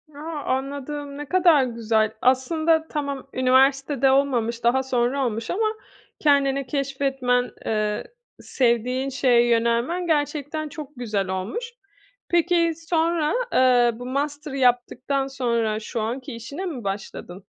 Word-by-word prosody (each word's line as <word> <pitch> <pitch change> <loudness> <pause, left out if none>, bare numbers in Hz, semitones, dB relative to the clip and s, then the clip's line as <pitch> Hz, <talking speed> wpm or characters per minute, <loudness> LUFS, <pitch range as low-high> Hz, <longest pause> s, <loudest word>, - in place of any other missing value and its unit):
A! - - -10 0.4
Anladım. 280 +1 -5
Ne 295 - -5
kadar 345 -7 +5
güzel. 220 -3 0
Aslında 315 +5 +2
tamam, 280 -3 -4
üniversitede 270 +1 +3
olmamış, 240 -4 +1
daha 260 +3 +3
sonra 260 +1 0
olmuş 225 -1 -3
ama 440 +3 0 0.5
kendini 275 -2 +2
keşfetmen, 270 -3 0
eee, 215 -1 -1 0.4
sevdiğin 250 +2 0
şeye 245 -2 +3
yönelmen 235 +10 +1
gerçekten 300 0 -1
çok 295 -1 -8
güzel 210 -6 -2
olmuş. 435 - -4 0.6
Peki, 340 -1 +2
sonra, 330 -1 0 0.2
eee, 245 -2 +5
bu 245 - -7
master'ı 285 +2 -3
yaptıktan 255 +2 +1
sonra 235 -5 -1
şu 225 +2 -4
anki 250 +4 -4
işine 280 +11 -6
mi 260 - -5
başladın? 195 -1 -6
265 Hz, 120 wpm, -23 LUFS, 240-290 Hz, 0.6 s, kadar